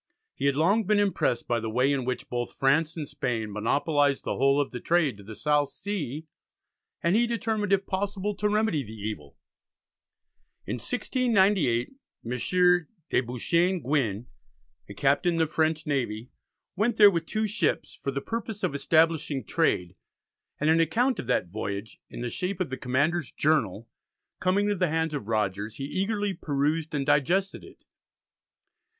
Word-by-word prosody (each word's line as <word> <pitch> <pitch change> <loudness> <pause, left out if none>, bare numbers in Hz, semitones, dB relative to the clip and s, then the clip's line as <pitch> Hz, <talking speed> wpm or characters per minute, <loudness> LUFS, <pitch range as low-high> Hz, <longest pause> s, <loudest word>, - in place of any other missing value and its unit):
He 140 - -1
had 140 - +2
long 195 +9 +3
been 210 +2 +3
impressed 195 -12 +1
by 120 -1 +1
the 115 0 -4
way 125 +5 +2
in 135 -3 -1
which 130 0 -3
both 120 0 -4
France 155 +5 +2
and 150 -3 -4
Spain 125 -7 -3
monopolised 140 +6 +1
the - - -2
whole 140 +1 +3
of 145 - -1
the 125 - -5
trade 160 -7 +2
to 100 - -13
the 110 +2 -9
South 145 +1 +1
Sea, 160 -7 -5 0.8
and 170 +3 +3
he 235 +2 +3
determined, 220 -3 -1
if 195 0 +3
possible, 200 +1 -2
to 210 - +1
remedy 210 -7 +1
the 110 -3 -9
evil. 105 -10 -6 1.3
In 110 +6 -3
1698 195 - +1 0.3
M. 115 - -4
de 175 - +1
Beauchesne 170 +10 +1
Gouin, 120 -6 0 0.6
a 100 - -8
captain 145 - +2
in - - -1
the 165 - +3
French 155 +1 0
navy, 125 -5 -2 0.4
went 215 +4 +1
there 205 -2 +9
with 165 -3 -2
two 215 0 -1
ships 210 0 -1
for - - -2
the 140 0 -2
purpose 225 0 -5
of - - 0
establishing 155 -2 +2
trade, 90 -2 0 0.6
and 150 +2 +3
an 165 - +4
account 240 - +2
of - - -5
that 90 - +1
voyage, 100 +2 -5
in - - -8
the 120 -1 -3
shape 185 - -3
of 180 -7 -2
the - - -1
commander's 140 +5 0
"Journal" 130 -8 0 0.5
coming 190 +3 +2
into 205 -1 0
the 180 -2 +1
hands 160 0 0
of 140 -8 -4
Rogers, 105 -1 -1
he 135 - -6
eagerly 200 +5 -1
perused 155 0 -1
and 140 -2 -1
digested 170 +7 +1
it. - - -16
150 Hz, 170 wpm, -27 LUFS, 125-190 Hz, 1.3 s, there